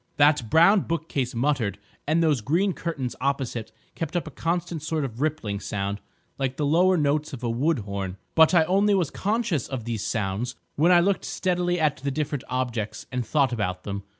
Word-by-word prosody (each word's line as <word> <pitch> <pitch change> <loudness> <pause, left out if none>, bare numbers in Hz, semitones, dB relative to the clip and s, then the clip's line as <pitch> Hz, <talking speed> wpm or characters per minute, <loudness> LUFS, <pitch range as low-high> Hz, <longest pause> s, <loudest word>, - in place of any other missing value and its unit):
That 145 -5 +4
brown 170 - +6
bookcase 150 -7 -2
muttered, 120 -6 0 0.3
and 160 +3 +3
those 150 -7 +2
green 175 - +1
curtains 145 -9 -4
opposite 130 -5 -2 0.2
kept 165 0 -5
up 175 - 0
a 155 - -8
constant 170 -1 -2
sort 155 -1 -1
of 120 -1 -7
rippling 140 -10 -1
sound 100 0 -3 0.4
like 135 -1 -1
the 150 - 0
lower 180 +5 +4
notes 150 0 0
of 125 -2 -7
a 120 - 0
wood 140 +7 +1
horn. 100 -3 -4 0.2
But 160 +2 +6
I 165 - +6
only 200 +4 +3
was 175 -7 0
conscious 205 - -1
of 130 -5 -5
these 115 -4 -3
sounds 110 +4 -2 0.2
when 165 +5 +4
I 175 -1 +7
looked 195 +2 +1
steadily 175 -1 0
at 150 -2 +2
the 140 +1 -3
different 145 -1 -2
objects, 120 -4 -3
and 125 -1 -1
thought 135 0 +1
about 90 -5 -2
them. 100 -1 -4
145 Hz, 190 wpm, -25 LUFS, 120-165 Hz, 0.4 s, I